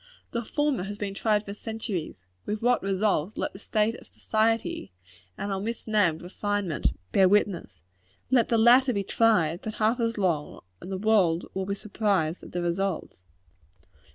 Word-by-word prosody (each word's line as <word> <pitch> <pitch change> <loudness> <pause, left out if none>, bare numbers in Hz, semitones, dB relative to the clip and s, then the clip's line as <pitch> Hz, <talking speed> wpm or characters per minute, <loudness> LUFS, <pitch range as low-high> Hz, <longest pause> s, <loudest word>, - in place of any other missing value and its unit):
The 235 0 -2
former 290 -4 0
has 205 +1 -6
been 200 -1 -3
tried 210 +1 +1
for 200 - -6
centuries 210 - -5 0.2
with 210 +1 -3
what 245 -1 +3
result, 195 -1 0
let - - -2
the 195 - -11
state 215 +1 +1
of - - -12
society 220 - -1 0.5
and 200 - -3
our 195 - -1
misnamed 210 -6 0
refinement 195 - -1 0.2
bear 190 -1 +5
witness. 180 - 0 0.5
Let 245 -3 +4
the 230 - +3
latter 245 +3 +6
be 200 -2 -1
tried 185 -7 +2
but 220 - -5
half 225 +3 +1
as 230 -1 0
long, 170 -7 -1 0.2
and 185 - -8
the 190 - -2
world 190 -5 +3
will 190 0 -3
be 200 - -1
surprised 200 -6 -1
at - - -11
the 175 0 -2
results. 175 - -2
205 Hz, 165 wpm, -27 LUFS, 185-220 Hz, 0.5 s, latter